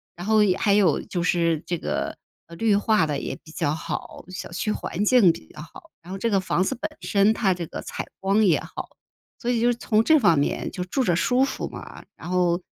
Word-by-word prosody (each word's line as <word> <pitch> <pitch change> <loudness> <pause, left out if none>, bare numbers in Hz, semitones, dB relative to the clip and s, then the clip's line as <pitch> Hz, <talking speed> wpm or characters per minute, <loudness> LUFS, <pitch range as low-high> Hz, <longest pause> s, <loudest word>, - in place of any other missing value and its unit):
然 175 - -8
后 215 0 +4
也 190 -3 +3
还 200 - +2
有 195 -7 +3
就 175 - -4
是 170 -3 +1
这 175 - -1
个， - - -3 0.4
绿 220 0 +3
化 210 -2 +3
得 145 -2 -2
也 - - -4
比 155 - -14
较 150 -1 -1
好， - - -6
小 185 -2 -7
区 190 +5 -2
环 205 -1 -3
境 220 -6 +6
比 80 - -10
较 - - -9
好， - - -14
然 175 +2 -12
后 195 - -4
这 230 +4 -1
个 195 - +3
房 185 -1 0
子 - - -1
本 315 - -3
身 200 +1 +3
它 195 -4 +1
这 175 -2 -5
个 - - -7
采 - - -6
光 195 +3 +2
也 175 -5 +4
好， - - -8 0.5
所 240 - -3
以 240 - +1
就 235 - +2
是 - - -1
从 220 -2 +1
这 315 +6 +5
方 170 - +4
面 145 - -1
就 180 - -4
住 260 +9 -1
着 180 -7 +2
舒 250 +10 +2
服 275 - -2
嘛。 - - -10
然 - - -9
后 180 -1 +1
190 Hz, 255 characters per minute, -24 LUFS, 175-220 Hz, 0.5 s, 境